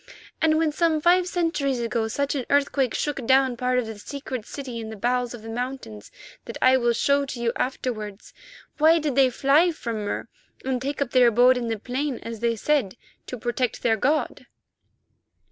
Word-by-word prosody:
And 315 -1 +3
when 320 -1 +1
some 320 0 +1
five 355 +3 +3
centuries 325 -7 -1
ago, 230 -1 -1
such 280 +5 -1
an 265 -4 -3
earthquake 280 -3 +1
shook 290 -3 -2
down 265 -1 +4
part 250 +1 0
of 250 - +1
the 220 -2 -8
secret 255 -2 -6
city 260 -5 -6
in 220 -1 -6
the 220 - -7
bowels 245 +3 -1
of 220 - -12
the - - -9
mountains 240 - -6 0.4
that - - -7
I 255 0 +5
will 240 -2 +2
show 280 +4 +2
to 255 - -6
you 235 -1 0
afterwards, 215 -5 -4 0.5
why 320 +2 +6
did 300 -3 -1
they 265 0 +4
fly 280 +7 +3
from 230 -9 -5
Mur 205 - -4 0.4
and 260 -2 -1
take 280 +2 -1
up 250 - -12
their 250 -2 +5
abode 245 +3 +5
in 245 -2 -3
the 225 -1 -2
plain, 255 +4 -3
as 230 -1 -6
they 230 0 0
said, 245 -4 0 0.3
to 250 - -6
protect 240 +2 -2
the 225 -2 +3
god?" 290 +8 -1
255 Hz, 195 wpm, -24 LUFS, 235-280 Hz, 0.5 s, why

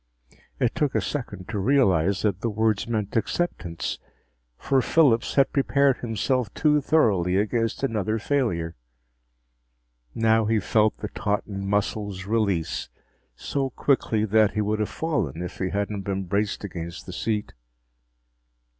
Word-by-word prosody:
It - - +1
took 145 -3 0
a - - +4
second 100 -10 -5
to 105 -2 -2
realize 100 - +2
that 100 -2 0
the 115 - 0
words 110 0 0
meant 110 -3 -2
acceptance, 105 - -2 0.6
for 135 -1 +2
Phillips 125 -4 +3
had 135 -1 +3
prepared 140 -1 +3
himself 120 +1 -1
too 150 -1 +3
thoroughly 100 - +2
against 115 +4 0
another 110 -4 0
failure. 105 - -1 1.4
Now 110 0 +3
he 110 0 +2
felt 105 +2 +2
the 105 - -5
tautened 100 -1 -2
muscles 100 -1 -1
release, 100 -6 0 0.5
so 135 -1 -2
quickly 115 -5 +1
that 110 0 +3
he 105 - 0
would 105 +1 0
have 105 - 0
fallen 100 - -2
if 90 - -7
he 95 - -1
hadn't 100 +1 -2
been 95 0 -2
braced 100 +4 -1
against 85 -3 -6
the - - -8
seat. 105 -2 -2
105 Hz, 135 wpm, -25 LUFS, 100-120 Hz, 1.4 s, a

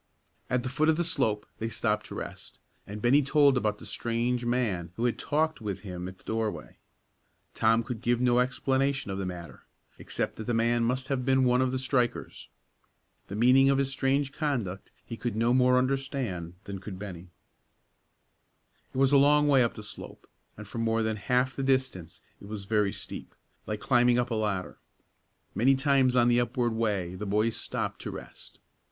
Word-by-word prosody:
At 125 -1 0
the 130 - -3
foot 155 +4 +1
of 160 - +3
the 175 - +1
slope 110 -10 0
they 115 - -2
stopped 105 -2 -1
to - - -8
rest, - - -8 0.3
and 105 +2 -7
Bennie 135 +5 +5
told 140 0 +4
about 105 -4 0
the - - -11
strange 120 +1 -1
man 110 -9 -1
who 115 - -1
had 120 - 0
talked 155 -2 0
with 100 -3 -4
him 90 -3 -6
at 95 0 -9
the - - -25
doorway. 110 -1 -3 0.7
Tom 115 +1 +3
could 115 -1 -6
give 120 0 +1
no 125 -1 +3
explanation 135 -1 0
of 95 - -3
the 95 - -2
matter, 85 -2 -9 0.3
except - - -3
that 110 - -6
the 120 - 0
man 115 +1 +2
must 130 +2 -1
have 135 -2 0
been 130 0 +3
one 125 0 +3
of 130 -1 +1
the 130 - -1
strikers. 130 -2 -2 0.8
The 100 - -6
meaning 130 +4 +5
of 135 - +3
his 135 -1 0
strange 135 +1 0
conduct 125 - -3 0.2
he 115 - -7
could 120 -2 -3
no 115 +2 +2
more 125 0 +4
understand 130 - -2
than 100 -1 -6
could 95 -1 -8
Bennie. 95 -3 -8 1.6
It - - -8
was 135 0 +4
a 140 - +6
long 150 +1 +5
way 135 -3 +5
up 115 - -1
the 105 - -8
slope, 105 - -10 0.3
and 110 -1 -9
for 115 - -6
more 115 0 +1
than 110 -1 -1
half 125 +4 0
the - - -3
distance 130 -11 -1 0.2
it - - -11
was 105 -2 -6
very 105 -1 +1
steep; - - -8 0.3
like 105 0 -3
climbing 120 -2 +4
up 120 0 0
a - - +1
ladder. 105 -4 -2 0.7
Many 135 +5 +4
times 135 -2 +3
on 120 -1 +5
the 120 0 +4
upward 120 -1 0
way 105 -6 -1
the 100 +3 -5
boys 105 +3 +1
stopped - - -4
to - - -5
rest. - - -11
120 Hz, 195 wpm, -28 LUFS, 105-130 Hz, 1.6 s, a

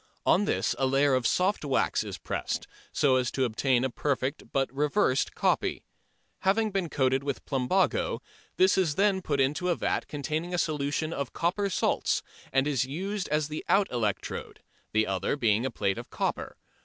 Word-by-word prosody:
On 200 +4 +4
this - - +1
a 135 - +2
layer 135 +1 +3
of 130 -2 +2
soft 185 +1 +1
wax 140 -3 +1
is - - -6
pressed, - - -3 0.3
so 130 -3 +3
as 125 -2 +1
to 135 - -1
obtain 125 +2 +1
a 130 - +1
perfect 140 +1 -2
but 135 -1 0
reversed 145 -1 +1
copy. - - 0 0.6
Having 215 +3 +2
been 190 -4 -1
coated 130 -2 +1
with 140 -1 -4
plumbago, 140 +8 +1 0.4
this 190 +1 +4
is 165 -6 +1
then 195 0 +2
put 145 -5 -1
into 145 +7 +1
a 175 - +3
vat - - -1
containing 155 +4 -3
a - - -1
solution 155 0 -1
of 140 -5 -4
copper 195 +4 0
salts 185 - +1 0.3
and 135 0 +2
is 140 -5 +1
used 185 +9 -3
as 150 -1 +1
the 155 +1 -5
out 200 0 +3
electrode, 110 -5 -3 0.3
the 110 0 +2
other 95 +5 -1
being 115 -2 +2
a - - -2
plate 100 -5 -1
of - - -9
copper. - - -3
145 Hz, 180 wpm, -28 LUFS, 130-180 Hz, 0.6 s, On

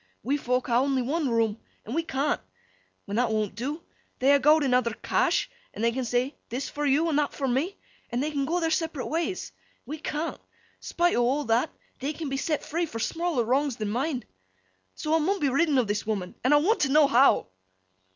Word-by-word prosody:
We 275 - +1
fok 250 -3 0
ha' - - -5
only 270 -2 +1
one 290 +2 0
room, 225 -2 +1 0.3
and 225 - -5
we 330 - +1
can't. 285 -2 -1 0.6
When 200 +1 -3
that 245 -1 +2
won't 215 -2 -1
do, 285 +8 -4 0.3
they 275 +2 +5
ha' 280 - +2
gowd 305 +3 +5
an' 260 -3 +1
other 235 -3 +2
cash, - - +1 0.3
an' 220 - -4
they 235 - +3
can 255 +1 -2
say 245 +4 0 0.2
"This 250 +4 -3
for 295 0 -2
yo' 295 +5 +3
an' 295 - +1
that 295 -1 0
for 275 - -1
me," 280 +10 0 0.3
an' 240 - -2
they 300 +3 -1
can 280 -2 -1
go 340 +5 0
their 325 -1 0
separate 320 -5 -1
ways. 335 +4 -2 0.3
We 305 +2 -6
can't. 310 +1 -3 0.4
Spite 350 +1 +1
o' 245 - +3
all 265 +5 +1
that, 230 +6 +2 0.3
they 280 +4 -2
can 310 -1 -5
be 270 - -2
set 300 +2 -1
free 340 +2 -1
for 230 - -7
smaller 330 +2 0
wrongs 265 +3 +1
than 215 -2 -3
mine. 255 +2 -1 0.7
So, 305 - -2
I - - +4
mun 385 +6 +1
be 285 - +2
ridden 285 +2 +2
o' 255 - +4
this 205 -1 -2
woman, 195 -5 -2
and 255 - +3
I 295 - +7
want 385 +10 +2
t' 275 - +2
know 300 +2 +6
how? 270 - +4
275 Hz, 220 wpm, -27 LUFS, 245-310 Hz, 0.7 s, I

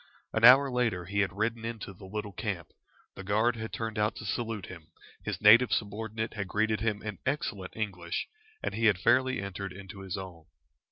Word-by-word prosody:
An 110 - 0
hour 135 +3 +9
later 115 -8 0
he 100 +3 -2
had 100 -1 +2
ridden 110 +2 -1
into 115 -4 -5
the 95 +1 -13
little 105 +1 -4
camp, 95 -4 -4 0.4
the 95 - -9
guard 110 +5 +2
had 110 0 -5
turned 110 -2 -3
out 105 +1 +1
to 110 - -8
salute 110 -1 -2
him, 85 -4 -11 0.3
his - - -4
native 110 +3 +7
subordinate 110 +1 -2
had 100 -3 -4
greeted 110 +2 +1
him 110 -2 -1
in 105 -4 -5
excellent 110 -9 -3
English, 90 -6 -3 0.4
and - - -2
he 115 +1 0
had 105 -4 +4
fairly 130 +7 +3
entered 100 -1 -5
into 95 +1 -10
his 95 -2 -5
own. 90 -4 -8
105 Hz, 190 wpm, -30 LUFS, 95-115 Hz, 0.4 s, hour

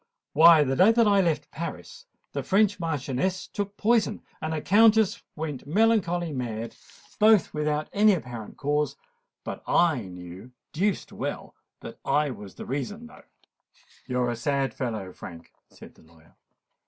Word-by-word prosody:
Why, 160 0 +7
the 135 -1 -1
day 190 +10 +6
that 230 -1 +4
I 200 -1 +4
left 155 -4 -1
Paris, 170 - -7 0.3
a - - -2
French 205 0 +2
Marchioness 165 +2 -2
took 205 0 -5
poison, 220 -1 +1 0.2
and 155 - -3
a 160 - -1
Countess 220 +3 +4
went 150 -4 -5
melancholy 175 -3 +1
mad—both 125 - 0
without 150 0 -1
any 210 0 +5
apparent 120 - -8
cause: 150 +1 -1 0.5
but - - -6
I 165 -7 +3
knew 90 +6 -11 0.2
deuced 195 +5 -1
well - - -5 0.3
what 145 -4 -1
was 100 -2 -11
the - - -8
reason, 205 - -4
though." 245 +1 -15 0.8
"You're 125 -1 0
a - - -3
sad 135 +3 -1
fellow, 110 -7 -4
Frank," 85 -1 -11 0.2
said - - -14
the - - -22
lawyer. 80 0 -22
155 Hz, 140 wpm, -26 LUFS, 125-200 Hz, 0.8 s, Why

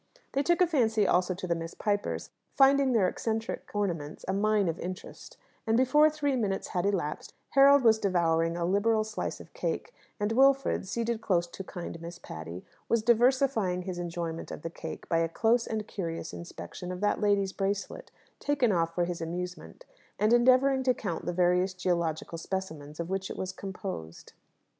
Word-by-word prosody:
They 275 - +1
took 345 +5 +2
a - - +8
fancy 225 - +2
also 180 0 +2
to 185 - -6
the 175 - +1
Miss 165 0 -6
Pipers, 205 -1 -2 0.2
finding 275 -1 +5
their 215 -6 +3
eccentric 225 +3 -3
ornaments 170 -8 -2
a 190 - 0
mine 205 0 +2
of 165 0 -2
interest; 185 +1 -8 0.3
and 225 +1 +3
before 295 +5 +5
three 290 -3 -1
minutes 205 -6 -1
had 180 +2 0
elapsed 175 -7 -2 0.2
Harold 275 0 +7
was 220 -2 +5
devouring 165 -3 +1
a 170 - -1
liberal 215 +4 +2
slice 215 0 -4
of - - -13
cake, - - -3 0.3
and 205 +1 0
Wilfred, 270 -3 +3
seated 230 +2 -2
close 175 -5 +1
to 175 +2 -8
kind 175 -3 -7
Miss 170 +1 -7
Patty, 80 - -8 0.2
was 230 -2 +2
diversifying 235 -5 +3
his 180 -1 -5
enjoyment 170 -1 -4
of - - -8
the 165 - -4
cake 165 -1 -8
by 165 - +2
a 165 0 +1
close 230 +7 +2
and 215 -1 -3
curious 165 -4 -5
inspection 180 +1 -7
of 180 - -5
that 205 +1 +1
lady's 200 -2 +2
bracelet, 200 - -3 0.3
taken 275 -6 +2
off 165 -2 0
for 175 - +2
his 175 -1 -4
amusement, 180 - -6 0.3
and 215 +2 +3
endeavouring 260 +2 +5
to 255 -1 +2
count 175 -5 -4
the - - +1
various 180 +1 +2
geological 170 -2 -1
specimens 160 -5 -5
of 170 +2 -4
which 190 0 -2
it - - -6
was 185 0 -3
composed. 185 - -7
195 Hz, 180 wpm, -29 LUFS, 175-230 Hz, 0.3 s, a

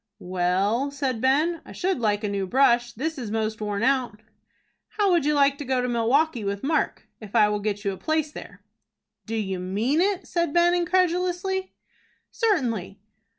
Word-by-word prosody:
"Well," 185 +8 0
said 270 -5 -3
Ben, 305 +6 +2
"I - - -12
should 375 -3 -1
like 210 -2 0
a - - 0
new 200 -1 -2
brush. 240 0 +3
This 300 +6 -4
is 235 -4 -5
most 220 0 -2
worn 205 0 -2
out." 255 -5 +1 0.8
"How 405 -3 +3
would 340 -5 +2
you 300 0 +2
like 280 0 +3
to - - -4
go 260 -1 0
to 250 - -1
Milwaukie 245 +2 +1
with 200 0 -3
Mark, 310 +3 -1
if 210 -3 -10
I 210 - +6
will 210 0 -1
get 205 0 -3
you 200 - +1
a 190 - -7
place 315 - -1
there?" - - -11 0.6
"Do 225 - -3
you 195 -4 -2
mean 215 - 0
it?" 390 -1 0
said 340 -4 -1
Ben, 345 0 +4
incredulously. 365 +1 0 0.6
"Certainly." 235 - -1
255 Hz, 180 wpm, -25 LUFS, 210-325 Hz, 0.8 s, I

